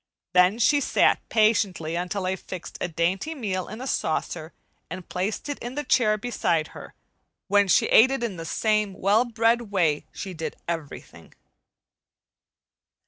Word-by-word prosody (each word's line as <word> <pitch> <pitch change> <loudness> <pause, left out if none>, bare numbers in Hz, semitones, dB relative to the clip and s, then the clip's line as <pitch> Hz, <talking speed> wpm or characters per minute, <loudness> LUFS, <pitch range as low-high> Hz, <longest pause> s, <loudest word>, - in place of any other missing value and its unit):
Then 180 +3 +5
she 285 +5 +3
sat - - +3
patiently 205 -7 +2
until 180 +2 -3
I 185 +1 0
fixed 185 -1 -9
a - - 0
dainty 180 - -1
meal 195 -9 -3
in 215 +4 -8
a - - -5
saucer 160 -7 -2 0.4
and 180 +1 -7
placed 190 +8 -3
it 290 - -4
in 240 +2 -6
the 295 - -2
chair 220 -5 +2
beside 175 -8 -1
her, - - -12 0.5
when 205 0 +4
she - - +4
ate 240 +4 +6
it 270 -2 -2
in 220 -5 -2
the 165 - -7
same 215 +3 0
well 205 +6 +2
bred 230 -1 +1
way 165 -7 +1
she 190 -2 -7
did 160 -1 -5
everything. 165 -4 -7
200 Hz, 155 wpm, -25 LUFS, 175-230 Hz, 0.5 s, ate